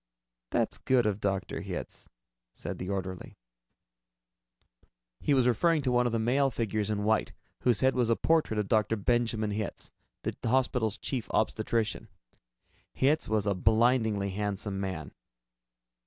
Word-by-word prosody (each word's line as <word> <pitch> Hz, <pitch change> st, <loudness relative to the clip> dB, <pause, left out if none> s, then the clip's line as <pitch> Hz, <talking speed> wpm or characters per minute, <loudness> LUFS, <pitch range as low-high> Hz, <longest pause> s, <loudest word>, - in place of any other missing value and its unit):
"That's -, -, 0 dB
good 125 Hz, -3 st, +2 dB
of 105 Hz, -1 st, 0 dB
Dr. 95 Hz, -1 st, -2 dB
Hitz," -, -, -6 dB, 0.4 s
said -, -, -7 dB
the 90 Hz, -, -4 dB
orderly. 95 Hz, -2 st, -5 dB, 1.8 s
He 145 Hz, -, +2 dB
was 130 Hz, -2 st, +3 dB
referring 150 Hz, +6 st, +3 dB
to 130 Hz, -, +1 dB
one 125 Hz, 0 st, +3 dB
of -, -, -1 dB
the 115 Hz, -, 0 dB
male 130 Hz, +5 st, +2 dB
figures 110 Hz, -4 st, -2 dB
in 105 Hz, -1 st, -1 dB
white, 110 Hz, +1 st, +1 dB, 0.3 s
whose 120 Hz, -5 st, +2 dB
head 130 Hz, 0 st, +4 dB
was 120 Hz, -2 st, +1 dB
a 115 Hz, -, +4 dB
portrait 160 Hz, -8 st, +1 dB
of 105 Hz, -2 st, 0 dB
Dr. 110 Hz, +1 st, +2 dB
Benjamin 110 Hz, 0 st, 0 dB
Hitz, 105 Hz, 0 st, -4 dB, 0.3 s
the -, -, -2 dB
hospital's 125 Hz, -3 st, +1 dB
Chief 125 Hz, -5 st, -3 dB
Obstetrician. 110 Hz, 0 st, 0 dB, 0.9 s
Hitz 145 Hz, +4 st, +1 dB
was 110 Hz, -2 st, +1 dB
a 100 Hz, -, +2 dB
blindingly 110 Hz, 0 st, +2 dB
handsome 100 Hz, 0 st, -3 dB
man. 95 Hz, -6 st, -4 dB
110 Hz, 140 wpm, -29 LUFS, 105-125 Hz, 1.8 s, head